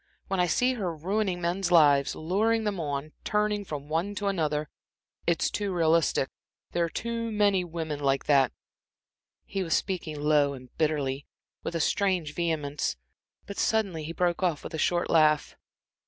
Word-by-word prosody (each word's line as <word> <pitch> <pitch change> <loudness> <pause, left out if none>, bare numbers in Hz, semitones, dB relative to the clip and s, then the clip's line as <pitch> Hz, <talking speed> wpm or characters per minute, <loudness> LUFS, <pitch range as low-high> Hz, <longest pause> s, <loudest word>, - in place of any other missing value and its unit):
When 195 -1 0
I 180 - +3
see 250 +10 +2
her 185 -9 -3
ruining 185 +2 -1
men's 175 +1 -1
lives, 145 -4 +5
luring 220 +7 +1
them 205 -3 -1
on, 145 -1 -3
turning 210 -1 0
from 145 -6 -6
one 170 +7 -1
to 205 - -3
another 155 -5 0 0.6
it's 170 -1 +2
too 205 -1 -2
realistic 165 -5 +2 0.4
there 170 - +1
are - - -4
too 230 +4 -3
many 205 -3 +3
women 160 -3 -4
like 135 -1 +1
that" 140 -3 +4 0.9
He 195 - -3
was 165 -3 +1
speaking 170 -6 -2
low 145 -1 +3
and 130 -2 -12
bitterly, 145 -3 -1 0.3
with - - -4
a - - 0
strange 180 -3 +1
vehemence, 150 - -1 0.5
but 200 - -7
suddenly 195 -8 +1
he 155 - -5
broke 175 +1 0
off, 170 -5 0
with - - -7
a 160 - -3
short 175 +3 +1
laugh. 155 -2 +3
170 Hz, 165 wpm, -28 LUFS, 150-195 Hz, 0.9 s, lives